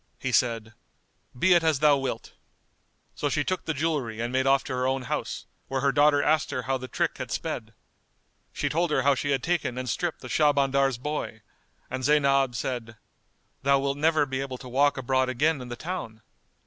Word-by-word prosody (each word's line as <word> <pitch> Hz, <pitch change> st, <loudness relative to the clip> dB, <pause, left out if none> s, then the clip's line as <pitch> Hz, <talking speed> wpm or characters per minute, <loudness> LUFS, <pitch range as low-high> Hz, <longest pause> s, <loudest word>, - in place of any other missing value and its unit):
He 130 Hz, -, -3 dB
said, 115 Hz, -2 st, +1 dB, 0.6 s
"Be 185 Hz, +8 st, +4 dB
it 170 Hz, -1 st, +4 dB
as 160 Hz, -3 st, +3 dB
thou 150 Hz, 0 st, +5 dB
wilt!" 135 Hz, -2 st, -4 dB, 0.8 s
So 145 Hz, -, -2 dB
she 145 Hz, +1 st, 0 dB
took 185 Hz, +3 st, -2 dB
the 160 Hz, -, -1 dB
jewellery 140 Hz, -7 st, -1 dB
and 120 Hz, +2 st, -3 dB
made 130 Hz, +1 st, +1 dB
off 135 Hz, 0 st, +4 dB
to -, -, -5 dB
her 125 Hz, 0 st, 0 dB
own 135 Hz, 0 st, -1 dB
house, -, -, -4 dB, 0.2 s
where 135 Hz, -1 st, -2 dB
her 140 Hz, 0 st, +3 dB
daughter 145 Hz, 0 st, +4 dB
asked 155 Hz, 0 st, +2 dB
her 125 Hz, -, -3 dB
how 135 Hz, +2 st, -1 dB
the 130 Hz, -, -7 dB
trick -, -, -2 dB
had -, -, -5 dB
sped. -, -, -4 dB, 0.8 s
She -, -, -2 dB
told 170 Hz, +2 st, +1 dB
her 150 Hz, -, +1 dB
how 140 Hz, -, +5 dB
she 145 Hz, +2 st, -2 dB
had 135 Hz, -3 st, +1 dB
taken 170 Hz, -8 st, -1 dB
and 130 Hz, 0 st, -4 dB
stripped 175 Hz, +6 st, -2 dB
the -, -, -8 dB
Shahbandar's 140 Hz, -3 st, +2 dB
boy, 125 Hz, -5 st, -4 dB, 0.4 s
and 130 Hz, +1 st, -5 dB
Zaynab 135 Hz, -3 st, +3 dB
said, 115 Hz, -2 st, -4 dB, 0.6 s
"Thou 140 Hz, 0 st, +4 dB
wilt 140 Hz, 0 st, -1 dB
never 155 Hz, -1 st, +3 dB
be 135 Hz, -1 st, -3 dB
able 135 Hz, -2 st, -5 dB
to 125 Hz, -, -11 dB
walk 140 Hz, +3 st, +2 dB
abroad 130 Hz, 0 st, +1 dB
again 145 Hz, +3 st, +1 dB
in 125 Hz, -, -8 dB
the 120 Hz, -, -5 dB
town." 120 Hz, -, -6 dB
135 Hz, 200 wpm, -26 LUFS, 130-150 Hz, 0.8 s, thou